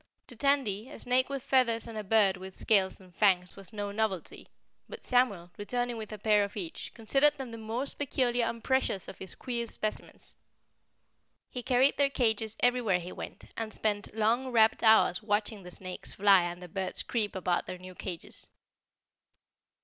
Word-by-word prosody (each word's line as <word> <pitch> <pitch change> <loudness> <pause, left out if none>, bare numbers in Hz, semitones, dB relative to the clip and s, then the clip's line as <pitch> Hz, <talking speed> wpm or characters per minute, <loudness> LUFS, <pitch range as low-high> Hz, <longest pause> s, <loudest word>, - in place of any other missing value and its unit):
To 245 - -9
Tandy 250 -4 +1
a - - -9
snake 255 +1 +2
with 275 -2 -4
feathers 250 -4 +2
and 230 - -8
a 215 - -3
bird 205 -2 +4
with 190 0 -9
scales 195 -4 +2
and 185 -2 -17
fangs 185 -4 +2
was 195 0 -7
no 205 -2 -4
novelty, 205 -4 -3 0.4
but - - -9
Samuel, 205 -9 +2
returning 245 +3 -2
with 220 -1 -7
a 215 - -5
pair 210 0 +3
of 200 +1 -5
each, 175 -5 -6
considered 275 +6 +3
them 265 -3 -6
the 230 - -8
most 230 +5 -4
peculiar 245 -4 +1
and 230 -1 -5
precious 260 -8 0
of - - -10
his 190 - -6
queer 235 -2 -3
specimens. 215 -1 -5 1.2
He 250 - -4
carried 255 +2 +3
their 280 -1 +4
cages 220 -4 0
everywhere 245 -6 +3
he 180 +1 -7
went - - -8
and 225 -1 -4
spent 210 0 -2
long 230 +4 +2
rapt 220 -2 +4
hours 220 -4 +5
watching 210 0 0
the 180 - -10
snakes 185 0 -6
fly 195 -3 +5
and 175 +1 -6
the - - -8
birds 190 +1 -2
creep 215 -4 -1
about 180 -2 0
their 185 - -5
new 185 +1 -11
cages. 180 -2 -7
220 Hz, 180 wpm, -30 LUFS, 195-245 Hz, 1.2 s, hours